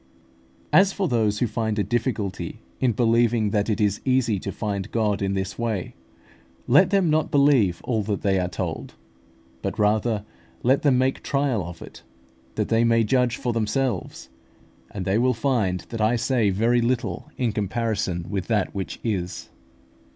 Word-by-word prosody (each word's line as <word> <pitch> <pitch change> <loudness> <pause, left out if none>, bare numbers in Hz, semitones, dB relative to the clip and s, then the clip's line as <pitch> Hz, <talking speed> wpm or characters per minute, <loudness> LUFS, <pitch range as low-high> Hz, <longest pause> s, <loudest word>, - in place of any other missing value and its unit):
As 195 +1 +6
for 195 -1 -1
those 110 -5 +1
who 120 - +1
find 110 -1 -2
a 105 - +2
difficulty 105 -8 -2 0.2
in 125 - +2
believing 115 -1 +2
that 105 +1 0
it 110 - 0
is 105 -1 +1
easy 125 -6 +1
to 100 - -5
find 100 0 -3
God 105 -3 0
in 100 0 0
this 95 +2 -4
way, 110 -6 -2 0.7
let 175 +9 +5
them 195 -5 +2
not 155 0 +1
believe 135 - +3
all 115 -3 0
that 105 -1 -3
they 95 -2 +2
are 90 - 0
told, 90 - -5 0.7
but - - -3
rather 105 0 +1 0.4
let 130 +3 +3
them 140 -4 +3
make 130 +1 +1
trial 140 -8 0
of 85 0 -8
it, - - -12 0.5
that - - -1
they 115 +1 +3
may 115 -1 +3
judge 125 +2 +2
for 120 -2 -2
themselves; 115 -1 -2 0.6
and 95 -3 -6
they 95 +4 +2
will 125 0 +2
find 110 -8 0
that 115 -2 -4
I 110 +3 +3
say 120 -2 +1
very 115 +5 +2
little 120 0 -2
in 120 -3 0
comparison 105 -4 -2
with 95 -1 -3
that 105 -4 0
which 95 -1 -5
is. 90 -5 -3
110 Hz, 170 wpm, -24 LUFS, 100-125 Hz, 0.7 s, As